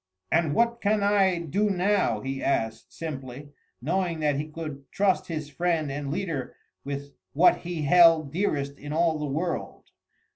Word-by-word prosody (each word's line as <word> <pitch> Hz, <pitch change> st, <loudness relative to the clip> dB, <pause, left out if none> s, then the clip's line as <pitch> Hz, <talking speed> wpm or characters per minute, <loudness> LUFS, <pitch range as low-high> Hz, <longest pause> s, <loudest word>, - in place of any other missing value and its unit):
"And 160 Hz, -3 st, +2 dB
what 235 Hz, 0 st, +2 dB
can 210 Hz, 0 st, +2 dB
I 195 Hz, -3 st, +3 dB
do 190 Hz, +6 st, 0 dB
now?" 185 Hz, -, +1 dB
he 135 Hz, +2 st, -4 dB
asked 110 Hz, -4 st, -1 dB
simply, 140 Hz, -3 st, -7 dB, 0.3 s
knowing 170 Hz, +1 st, -1 dB
that 145 Hz, -2 st, +1 dB
he 150 Hz, +2 st, -3 dB
could 150 Hz, -3 st, -8 dB
trust 195 Hz, -2 st, +1 dB
his 155 Hz, -3 st, -4 dB
friend 160 Hz, -1 st, 0 dB
and 140 Hz, 0 st, -4 dB
leader 145 Hz, -4 st, -3 dB, 0.3 s
with 140 Hz, 0 st, -6 dB, 0.2 s
what 170 Hz, +5 st, +5 dB
he 170 Hz, -3 st, -5 dB
held 165 Hz, -2 st, +5 dB
dearest 145 Hz, -7 st, -1 dB
in 145 Hz, +1 st, -6 dB
all 165 Hz, -1 st, +2 dB
the 150 Hz, -, -2 dB
world. 160 Hz, +5 st, -4 dB
160 Hz, 155 wpm, -26 LUFS, 140-180 Hz, 0.3 s, what